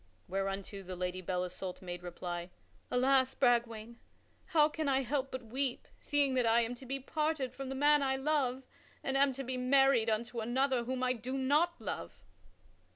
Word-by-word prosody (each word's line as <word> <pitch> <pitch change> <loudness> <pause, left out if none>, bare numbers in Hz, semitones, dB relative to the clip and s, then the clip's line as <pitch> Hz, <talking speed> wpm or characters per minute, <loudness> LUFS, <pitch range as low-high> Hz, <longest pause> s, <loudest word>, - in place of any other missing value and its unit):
Whereunto 195 +1 -3
the 185 -1 -7
Lady 180 +1 -3
Belle 180 0 -1
Isoult 180 0 -6
made 175 -2 -6
reply: 175 0 -5 0.4
"Alas, 260 +1 +3
Bragwaine, 235 -2 +1 0.5
how 315 -5 +5
can 310 -1 -2
I 270 0 +2
help 270 +1 -1
but 260 -1 -6
weep 255 +2 -2
seeing 285 -2 +1
that 250 -2 +2
I 230 +1 +5
am 230 +1 -1
to 250 +1 -11
be 275 +2 -2
parted 300 -2 -1
from 270 0 -6
the 270 - -3
man 295 +2 +4
I 265 -1 +1
love 265 -2 0 0.4
and 270 - -1
am 275 0 +4
to 270 +2 -5
be 255 0 -3
married 255 -2 +4
unto 230 +2 -1
another 245 +2 +1
whom 255 +1 -2
I 255 0 +2
do 255 +3 -4
not 295 +6 +2
love?" 135 - -5
255 Hz, 180 wpm, -33 LUFS, 220-270 Hz, 0.5 s, how